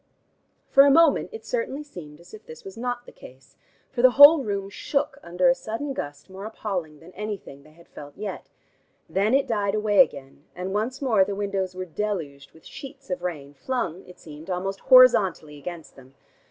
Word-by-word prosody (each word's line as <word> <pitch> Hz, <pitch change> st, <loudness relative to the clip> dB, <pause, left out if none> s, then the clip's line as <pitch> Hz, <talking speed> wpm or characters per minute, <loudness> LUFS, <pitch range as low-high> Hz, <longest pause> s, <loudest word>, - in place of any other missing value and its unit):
For 275 Hz, -, +7 dB
the 285 Hz, -, +5 dB
moment 320 Hz, +1 st, +4 dB
it 450 Hz, -, -10 dB
certainly 460 Hz, -, -3 dB
seemed 160 Hz, -, -12 dB
as 170 Hz, -, -18 dB
if 215 Hz, -, -13 dB
this 160 Hz, 0 st, -12 dB
was 195 Hz, 0 st, -10 dB
not 245 Hz, +1 st, -4 dB
the -, -, -13 dB
case, 130 Hz, 0 st, -16 dB, 0.4 s
for 240 Hz, -, -2 dB
the 255 Hz, -, +7 dB
whole 285 Hz, +1 st, +9 dB
room 200 Hz, -3 st, -3 dB
shook 285 Hz, +6 st, -2 dB
under 175 Hz, +1 st, 0 dB
a 175 Hz, -, +6 dB
sudden 225 Hz, +10 st, -5 dB
gust 145 Hz, -, -7 dB
more 190 Hz, +1 st, -10 dB
appalling 185 Hz, -8 st, -5 dB
than 165 Hz, +3 st, -15 dB
anything 200 Hz, -9 st, -7 dB
they 155 Hz, +2 st, -20 dB
had 170 Hz, +1 st, -20 dB
felt 145 Hz, -1 st, -12 dB
yet. 205 Hz, -2 st, -7 dB, 0.6 s
Then 205 Hz, +6 st, +1 dB
it 275 Hz, -, +2 dB
died 205 Hz, -5 st, -1 dB
away 210 Hz, -1 st, +1 dB
again, 140 Hz, -, +1 dB
and 185 Hz, +2 st, -5 dB
once 245 Hz, +7 st, -2 dB
more 220 Hz, -7 st, +4 dB
the 200 Hz, +1 st, -4 dB
windows 195 Hz, -2 st, -3 dB
were 185 Hz, 0 st, -5 dB
deluged 160 Hz, -7 st, -5 dB
with 160 Hz, -, -21 dB
sheets 275 Hz, -2 st, -11 dB
of 180 Hz, -, -3 dB
rain 150 Hz, -6 st, -5 dB
flung, 185 Hz, -, -4 dB
it 180 Hz, 0 st, -14 dB
seemed, 155 Hz, +1 st, -12 dB
almost 190 Hz, +2 st, -3 dB
horizontally 210 Hz, -, +5 dB
against 170 Hz, +2 st, -9 dB
them. 135 Hz, 0 st, -18 dB
195 Hz, 195 wpm, -24 LUFS, 165-245 Hz, 0.6 s, whole